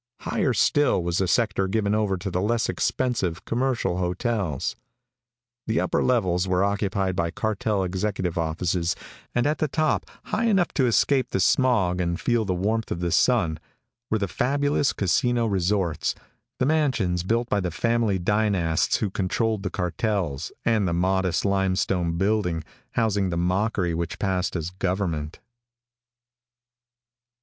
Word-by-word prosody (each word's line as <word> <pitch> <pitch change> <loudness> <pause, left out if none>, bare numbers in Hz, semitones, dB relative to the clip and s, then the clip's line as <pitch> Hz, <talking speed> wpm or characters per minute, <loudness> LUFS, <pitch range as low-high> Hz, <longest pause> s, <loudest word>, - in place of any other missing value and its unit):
Higher 135 - 0
still 140 -4 +2
was 85 0 0
the 95 - +1
sector 100 -2 +1
given 100 +1 0
over 105 -3 +1
to 95 +2 -5
the 90 - 0
less 115 +3 0
expensive 110 -10 -1
commercial 120 -7 0
hotels. 90 - -1 0.9
The 110 - +1
upper - - 0
levels 95 -7 +1
were 90 0 +2
occupied 100 -2 0
by 85 -2 0
cartel 105 +1 -1
executive 95 -1 -2
offices 85 +1 -1 0.4
and 120 0 +2
at 150 +1 +1
the 155 - +1
top, 155 +1 0 0.2
high 230 - -1
enough 195 -6 +3
to 130 -4 +2
escape 130 +2 +2
the - - -1
smog 95 -7 +2
and 85 0 -1
feel 120 -2 +1
the 95 -2 -1
warmth 110 +5 -1
of - - -3
the 85 -1 -1
sun, 85 -5 +2 0.5
were 110 - +2
the 100 -2 -1
fabulous 145 +6 +1
casino 115 +6 +1
resorts, 95 -5 0 0.4
the 125 - +1
mansions 130 - +1
built 115 +6 0
by 105 - +1
the 90 -2 -1
family 115 +2 +1
dynasts 95 -4 +1
who 105 - -2
controlled 105 +3 0
the 95 - -2
cartels, 90 -4 -2
and 110 -4 +2
the 85 - 0
modest, 95 0 +1
limestone 95 -3 +1
building 95 -4 0 0.3
housing 105 -4 +1
the 85 - -2
mockery 90 +1 0
which 85 0 -3
passed 95 -2 -1
as 85 0 -3
government. 90 -5 -2
95 Hz, 145 wpm, -25 LUFS, 90-115 Hz, 0.9 s, enough